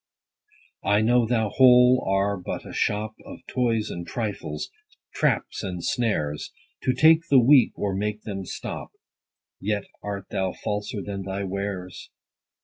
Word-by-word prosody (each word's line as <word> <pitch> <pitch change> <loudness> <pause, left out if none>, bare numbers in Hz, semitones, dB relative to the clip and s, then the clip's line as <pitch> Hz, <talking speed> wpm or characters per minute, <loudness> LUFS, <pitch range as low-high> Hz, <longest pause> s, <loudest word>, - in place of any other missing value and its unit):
I 105 +1 +3
know 120 +1 +3
thou 110 -3 +1
whole 125 +1 +6
are 100 +1 +2
but 90 -2 -6
a - - -9
shop 105 +1 -1
Of - - -11
toys 115 -4 0
and 85 0 -6
trifles, 105 -9 -4 0.4
traps - - 0
and 90 -4 -5
snares, 75 -12 -1 0.3
To 130 - +3
take 160 +4 +5
the 140 - +6
weak, 130 +1 +5
or 100 -2 -1
make 105 +2 -2
them 95 -3 -5
stop: - - -6 0.7
Yet 105 0 -1 0.2
art 100 -1 -5
thou 95 -2 -1
falser 105 -1 -4
than 100 -1 -5
thy 95 +1 -4
wares. 95 -1 -5
105 Hz, 140 wpm, -25 LUFS, 95-120 Hz, 0.7 s, whole